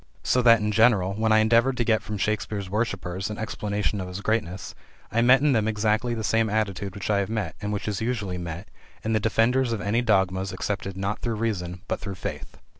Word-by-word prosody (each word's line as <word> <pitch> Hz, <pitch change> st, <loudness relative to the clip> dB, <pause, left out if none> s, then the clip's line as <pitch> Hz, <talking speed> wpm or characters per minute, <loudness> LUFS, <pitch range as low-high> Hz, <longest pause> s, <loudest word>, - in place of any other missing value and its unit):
So 125 Hz, -, +2 dB
that, 115 Hz, -2 st, +6 dB
in 105 Hz, 0 st, 0 dB
general, 105 Hz, -4 st, +4 dB
when 110 Hz, +2 st, 0 dB
I 110 Hz, -, +6 dB
endeavored 115 Hz, +4 st, +3 dB
to 120 Hz, -, +2 dB
get 110 Hz, -2 st, +2 dB
from 105 Hz, -, -5 dB
Shakespeare's 100 Hz, -1 st, -2 dB
worshipers 95 Hz, -3 st, -2 dB
an 105 Hz, -, -5 dB
explanation 105 Hz, -2 st, -2 dB
of 90 Hz, -, -5 dB
his 90 Hz, +1 st, -6 dB
greatness, 100 Hz, -4 st, -2 dB, 0.4 s
I 115 Hz, +3 st, +2 dB
met 125 Hz, +2 st, +6 dB
in 150 Hz, 0 st, +3 dB
them 110 Hz, -3 st, +2 dB
exactly 110 Hz, +2 st, 0 dB
the 110 Hz, -, -4 dB
same 115 Hz, +1 st, +2 dB
attitude 100 Hz, -2 st, -2 dB
which 100 Hz, +1 st, -3 dB
I 100 Hz, -, +3 dB
have 100 Hz, -, -1 dB
met, 105 Hz, -7 st, -3 dB
and 105 Hz, 0 st, -3 dB
which 105 Hz, 0 st, -3 dB
is 105 Hz, -1 st, -2 dB
usually 105 Hz, -6 st, -2 dB
met, 85 Hz, +2 st, -6 dB, 0.4 s
in 110 Hz, -, 0 dB
the 110 Hz, -, +3 dB
defenders 115 Hz, +4 st, +2 dB
of 110 Hz, -, -2 dB
any 105 Hz, +5 st, +1 dB
dogmas 95 Hz, -4 st, +1 dB
accepted 95 Hz, 0 st, -3 dB
not 100 Hz, +3 st, -2 dB
through 115 Hz, -2 st, -2 dB
reason, 90 Hz, -5 st, -3 dB
but -, -, -2 dB
through 100 Hz, -2 st, -6 dB
faith. -, -, -6 dB
105 Hz, 220 wpm, -25 LUFS, 95-115 Hz, 0.4 s, that